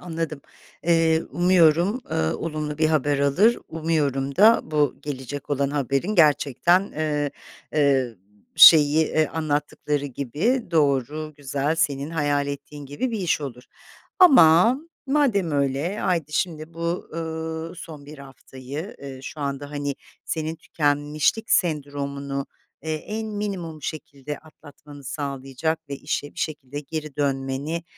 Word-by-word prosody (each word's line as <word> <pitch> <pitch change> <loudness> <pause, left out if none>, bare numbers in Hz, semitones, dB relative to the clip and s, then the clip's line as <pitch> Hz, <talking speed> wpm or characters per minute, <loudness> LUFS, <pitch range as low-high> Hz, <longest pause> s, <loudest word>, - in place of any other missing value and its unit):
anladım. 165 -4 -4 0.4
Eee, 165 -1 +3
umuyorum, 175 - +3
ııı, 80 0 0
olumlu 155 -2 -4
bir 155 - +4
haber 145 -2 +1
alır, 180 +12 +3
umuyorum 145 -4 -1
da 220 +4 +7
bu 150 -3 +1
gelecek 140 0 -6
olan 140 -1 +1
haberin 140 - -1
gerçekten, 155 - +4
ııı, 150 -2 -1 0.5
ııı, 135 -7 +2 0.4
şeyi, 155 0 +8
ııı, 155 -2 +3
anlattıkları 150 -2 -2
gibi 150 - -1
doğru, 150 0 0
güzel, 145 +2 -1
senin 145 -2 -1
hayal 145 -3 0
ettiğin 140 0 -7
gibi 145 - -3
bir 225 - -2
iş 175 -4 0
olur. 125 -3 -7 0.6
Ama 235 - +7 0.3
madem 260 - +2
öyle, 140 +8 0
haydi 165 -5 -1
şimdi 160 -1 -2
bu, 170 +1 -3
ııı, 160 +1 -4
son 155 -5 -10
bir 150 0 -11
haftayı, 135 - -9
ııı, 135 -1 -8
şu 150 - -8
anda, 140 0 -4
hani, 145 -1 -3 0.3
senin 160 0 -3
tükenmişlik 150 +9 0
sendromunu, 140 -4 -1 0.4
eee, 160 0 -2
en 215 +8 -5
minimum 195 -7 -5
şekilde 145 -1 -6
atlatmanı 150 -2 -15
sağlayacak 140 +3 -3
ve 140 - -4
işe 145 0 -4
bir - - -12
şekilde 145 -2 -4
geri 155 0 -6
dönmeni 140 +3 -2
150 Hz, 125 wpm, -24 LUFS, 140-165 Hz, 0.6 s, şeyi